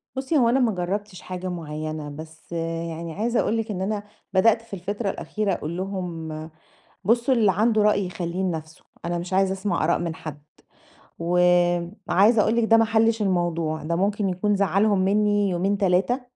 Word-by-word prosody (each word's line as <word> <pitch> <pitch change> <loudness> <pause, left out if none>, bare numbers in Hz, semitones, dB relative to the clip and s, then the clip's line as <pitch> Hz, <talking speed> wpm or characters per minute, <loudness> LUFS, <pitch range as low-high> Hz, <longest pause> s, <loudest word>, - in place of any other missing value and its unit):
بُصي 270 +4 0
هو 235 -3 +4
أنا 265 +3 +3
ما 235 -3 +3
جرَبتِش 190 +2 -3
حاجة 185 0 -6
معيَّنة، 155 -2 -5
بس 160 +3 -11 0.4
يعني 165 0 -6
عايزة 230 +5 0
أقول 225 - +1
لِك 225 -1 -2
إن 185 -1 -4
أنا، 205 +1 -2 0.3
بدأت 225 +4 +4
في 230 -3 -16
الفترة 200 +3 -3
الأخيرة 210 0 -2
أقول 165 +2 -4
لهُم: 165 -5 -5 0.6
"بُصوا 235 +5 +3
اللي 210 -5 +4
عنده 215 +2 +2
رأي 205 -2 +2
يخلِّيه 175 +1 -4
لنفسه، 160 -3 -4 0.2
أنا 175 0 -1
مش 175 +2 -6
عايزة 190 0 +3
أسمع 190 -4 -1
آراء 170 - +2
من 170 -2 -3
حد." 150 -2 -8 0.8
وعايزة 180 +4 +3
أقول 225 - +2
لِك 235 - +2
ده 225 0 +5
ما 225 - +4
حلِّش، 225 0 +2
الموضوع 170 -5 0
ده 170 +2 -1
ممكن 200 +1 0
يكون 205 +3 0
زعَّلهُم 200 +1 +2
منِّي 205 0 +2
يومين، 190 +3 0
3، 195 +7 +2
190 Hz, 170 wpm, -24 LUFS, 170-210 Hz, 0.8 s, ده